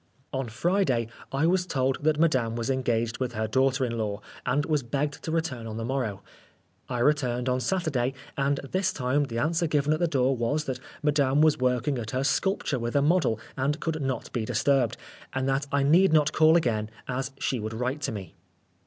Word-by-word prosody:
On 135 -3 -2
Friday 130 - +1 0.2
I 135 +3 +1
was 180 +1 +2
told 135 -2 0
that 155 0 +2
Madame 130 -9 +2
was 115 +2 -1
engaged 120 -3 0
with 125 -2 -2
her 110 0 -1
daughter 130 +3 +2
in 115 -1 -3
law, 105 -2 -2 0.3
and 140 +4 +1
was 150 -2 +1
begged 140 +4 -2
to 160 - -3
return 150 -9 -2
on 110 0 -5
the 115 - -3
morrow. 120 -6 -2 0.7
I 125 - -2
returned 125 -2 +1
on 125 0 +1
Saturday, 135 -6 0 0.2
and 140 0 +1
this 185 0 +1
time 135 +2 0
the 115 -4 -5
answer 165 +6 +1
given 150 0 +2
at 155 - -1
the 175 - +2
door 135 -3 +2
was, 145 +6 -1
that 130 -1 -3 0.2
Madame 145 -2 +2
was 155 -3 +4
working 125 +1 +1
at 110 -2 -5
her 130 - 0
sculpture 145 -1 0
with 120 +2 -3
a 140 - +4
model 145 - +2 0.2
and 140 +4 0
could 160 -2 -2
not 130 -3 -3
be 120 - -1
disturbed, 125 +1 +1 0.4
and 130 0 -1
that 135 +1 0
I 140 -1 +2
need 165 +5 +5
not 155 -1 +4
call 160 0 +5
again, 110 -8 0 0.2
as 130 +1 -2
she 130 - -1
would 110 +1 -4
write 125 +5 -2
to - - -1
me. 100 -6 -7
135 Hz, 205 wpm, -27 LUFS, 120-150 Hz, 0.7 s, need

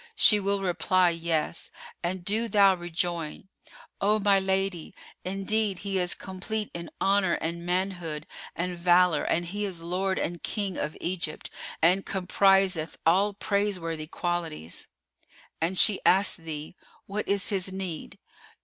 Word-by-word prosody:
She 210 - +6
will 200 0 0
reply, 180 0 +2
Yes; 165 -1 -2 0.3
and 175 0 -3
do 220 +4 +1
thou 200 -2 +5
rejoin:—O 175 +4 -3
my 200 -1 +4
lady, 190 -2 -1 0.3
indeed 195 +1 0
he 195 -1 0
is 180 -1 0
complete 205 +3 -4
in 170 -1 -6
honour 195 -2 +2
and 170 +1 -3
manhood 175 -4 -2 0.3
and 180 +2 -2
valour 175 -2 +4
and 175 +1 0
he 205 +4 -4
is 180 -5 -4
lord 185 +2 -1
and 170 0 -3
King 200 -4 -2
of 150 - -3
Egypt 170 -3 -3 0.3
and 180 +4 +5
compriseth 190 -3 +2
all 195 +5 +3
praiseworthy 185 -7 -1
qualities. 170 - -4 0.7
An 170 +3 0
she 195 +1 +6
ask 190 +1 +4
thee, 160 -1 -7 0.3
What 205 +2 -3
is 200 -1 +1
his 190 -2 -1
need? 185 -4 -5
185 Hz, 130 wpm, -27 LUFS, 170-195 Hz, 0.7 s, She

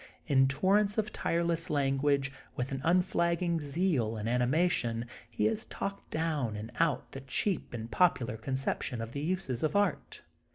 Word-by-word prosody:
In 135 -3 +4
torrents 200 +9 +2
of 215 -1 -1
tireless 170 0 0
language, 140 0 +1 0.2
with 125 +1 -3
an 135 0 -3
unflagging 170 -1 +2
zeal 140 - 0
and 105 +1 -3
animation, 125 -1 +1 0.2
he 115 - -1
has 220 0 0
talked 200 0 -5
down 155 -8 -1
and 110 +3 -6
out 165 -4 +1
the 135 - -7
cheap 170 +9 -1
and 115 -1 -6
popular 125 -10 +2
conception 130 0 -2
of 115 0 -5
the 140 - -4
uses 155 -7 -2
of 155 +2 0
art. 205 0 0
145 Hz, 155 wpm, -31 LUFS, 125-175 Hz, 0.2 s, In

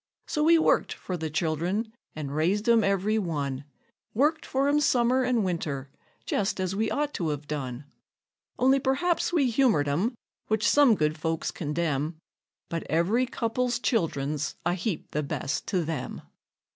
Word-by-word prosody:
So 300 - -1
we 330 +2 +6
worked 320 - +2
for 185 - -5
the 160 -2 -3
child'rn, 170 +8 -1 0.2
and 145 -2 -5
raised 190 +8 +1
'em 230 -2 +5
every 200 +2 +1
one; 140 -7 -3 0.5
Worked 300 +7 +2
for 270 +1 +1
'em 290 +1 +3
summer 250 -2 +3
and 250 -4 +1
winter, 145 -6 -3 0.3
just 195 -1 -1
as 185 0 -1
we 220 +2 0
ought 295 0 -1
to 165 -3 -1
've 145 0 -5
done; 135 -3 -4 0.7
Only 265 +2 +4
perhaps 280 +9 +1
we 280 -8 +2
humored 225 - +3
'em, 185 - 0 0.3
which 220 +1 +1
some 280 -5 +6
good 155 -2 0
folks 160 0 -1
condemn, 155 -1 -2 0.5
But 165 -1 -3
every 190 - +2
couple's 240 +1 -1
child'rn's 155 - -1
a 175 - +2
heap 185 -1 -3
the 150 - -1
best 140 -1 -3
to 180 -4 0
them. 150 -5 -4
185 Hz, 160 wpm, -27 LUFS, 155-245 Hz, 0.7 s, we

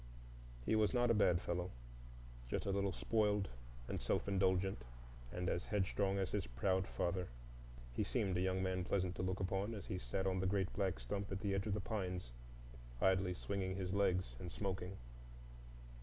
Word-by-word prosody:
He - - +3
was 110 -1 +3
not 120 -1 +4
a - - +6
bad 90 -5 +4
fellow,—just - - -5
a 100 - +1
little 100 0 +1
spoiled 105 -1 +2 0.4
and - - -2
self - - +1
indulgent, 95 -6 +2 0.5
and 90 0 -2
as 85 +1 0
headstrong 100 -1 +1
as 95 -2 0
his 105 -3 0
proud 95 +10 +1
father. 90 0 -1 0.7
He - - +1
seemed 95 -2 0
a 90 - +2
young 95 0 +1
man 95 -1 0
pleasant 90 0 +1
to - - -1
look 95 +1 0
upon, 95 +4 0
as 100 - -6
he 90 - -3
sat 95 +10 -2
on 95 -1 +1
the 95 - +1
great 95 -1 +1
black 95 -9 0
stump 100 +13 -3
at 95 0 -2
the 100 -2 +1
edge 95 +2 0
of 100 - +1
the - - 0
pines 90 - -2 0.7
idly 95 +1 +3
swinging 95 -1 -2
his 95 -1 -2
legs 95 -10 +2
and 90 - -5
smoking. 95 -1 -3
95 Hz, 180 wpm, -39 LUFS, 90-100 Hz, 0.7 s, a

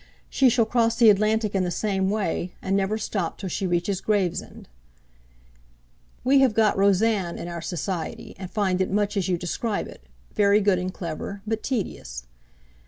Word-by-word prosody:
She 265 -2 +4
shall 235 -1 +3
cross 230 0 +2
the 230 -3 +7
Atlantic 215 +1 +1
in 195 -2 +1
the 180 - -1
same 190 +1 0
way; 190 -3 -2
and 195 +1 -1
never 200 +2 +1
stop 195 -5 -3
till 190 - -5
she 190 +2 -2
reaches 175 +2 -1
Gravesend.' 200 -5 -2 1.6
'We 270 +2 +5
have 260 -5 +3
got 220 -2 +3
"Rosanne" 200 -2 +2
in - - -6
our 170 -1 -5
Society, 175 0 -4
and 185 -2 -6
find 190 -3 0
it 190 - 0
much 205 +2 0
as 195 -2 0
you 180 -2 +1
describe 200 +5 -2
it; - - -13 0.3
very 205 0 +4
good 200 -3 +2
and 185 +1 -3
clever, 185 +3 -6
but 220 0 -2
tedious. - - -4
200 Hz, 170 wpm, -25 LUFS, 185-215 Hz, 1.6 s, the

